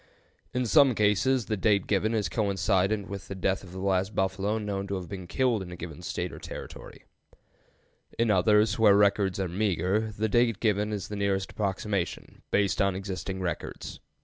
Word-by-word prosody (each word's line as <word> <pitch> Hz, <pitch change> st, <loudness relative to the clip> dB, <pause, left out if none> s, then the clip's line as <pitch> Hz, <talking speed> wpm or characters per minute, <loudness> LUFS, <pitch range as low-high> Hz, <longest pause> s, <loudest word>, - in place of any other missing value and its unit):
In 125 Hz, 0 st, -1 dB
some 135 Hz, 0 st, +5 dB
cases 105 Hz, +4 st, +2 dB
the 110 Hz, -, -1 dB
date 100 Hz, -1 st, +2 dB
given 110 Hz, +3 st, +1 dB
is 105 Hz, -2 st, 0 dB
coincident 100 Hz, -1 st, 0 dB
with 100 Hz, -1 st, -7 dB
the 100 Hz, -, -6 dB
death 95 Hz, +1 st, -1 dB
of 90 Hz, -, -12 dB
the 95 Hz, -, -9 dB
last 95 Hz, +1 st, 0 dB
buffalo 95 Hz, +3 st, 0 dB
known 100 Hz, -2 st, -3 dB
to 100 Hz, -, -2 dB
have 90 Hz, -2 st, -5 dB
been 95 Hz, -3 st, -7 dB
killed 125 Hz, -1 st, +1 dB
in 90 Hz, -2 st, -7 dB
a -, -, -6 dB
given 85 Hz, -1 st, -8 dB
State -, -, -4 dB
or -, -, -9 dB
Territory; -, -, -9 dB, 1.1 s
in 115 Hz, -1 st, +2 dB
others, 105 Hz, +4 st, +3 dB
where 105 Hz, -3 st, +6 dB
records 100 Hz, -2 st, +2 dB
are 95 Hz, -, 0 dB
meager, 100 Hz, +3 st, 0 dB
the 110 Hz, +2 st, +1 dB
date 115 Hz, -1 st, +2 dB
given 105 Hz, -1 st, +1 dB
is 100 Hz, -2 st, -3 dB
the 105 Hz, -, -4 dB
nearest 100 Hz, -1 st, -1 dB
approximation, 100 Hz, -2 st, -3 dB
based 100 Hz, -1 st, +1 dB
on 100 Hz, -1 st, +2 dB
existing 95 Hz, 0 st, -4 dB
records. 90 Hz, -2 st, -5 dB
100 Hz, 180 wpm, -28 LUFS, 95-110 Hz, 1.1 s, where